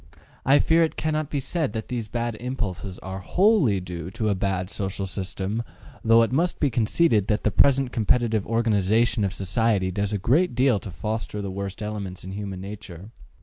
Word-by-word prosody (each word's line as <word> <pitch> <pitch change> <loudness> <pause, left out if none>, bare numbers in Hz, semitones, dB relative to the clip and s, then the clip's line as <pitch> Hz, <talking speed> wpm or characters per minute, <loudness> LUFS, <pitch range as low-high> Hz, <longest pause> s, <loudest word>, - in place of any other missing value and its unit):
I 135 +2 +7
fear 165 +2 +4
it 160 - +1
cannot 155 -1 -1
be 145 - -1
said 150 -3 -2
that 110 -1 -5
these 120 -3 -3
bad 120 +1 -2
impulses 105 -7 -4
are 95 0 -5
WHOLLY 175 - +3
due 90 -2 -6
to 110 +1 -2
a - - +3
bad 95 -1 -2
social 95 -1 -3
system, 95 +3 -3 0.4
though 115 0 +6
it 115 - -1
must 170 +7 +1
be 145 - +2
conceded 110 - +2
that 105 - 0
the 110 - +2
present 135 +3 +4
competitive 115 -2 +1
organization 115 0 +2
of 95 - 0
society 100 0 0
does 100 +2 -1
a 105 - 0
great 135 - +2
deal 125 -4 +3
to 100 - -8
foster 105 +3 -4
the 100 -2 -4
worst 100 +2 -5
elements 100 -4 -5
in 95 - -7
human 100 -2 -5
nature. 100 -1 -9
110 Hz, 190 wpm, -25 LUFS, 95-120 Hz, 0.4 s, I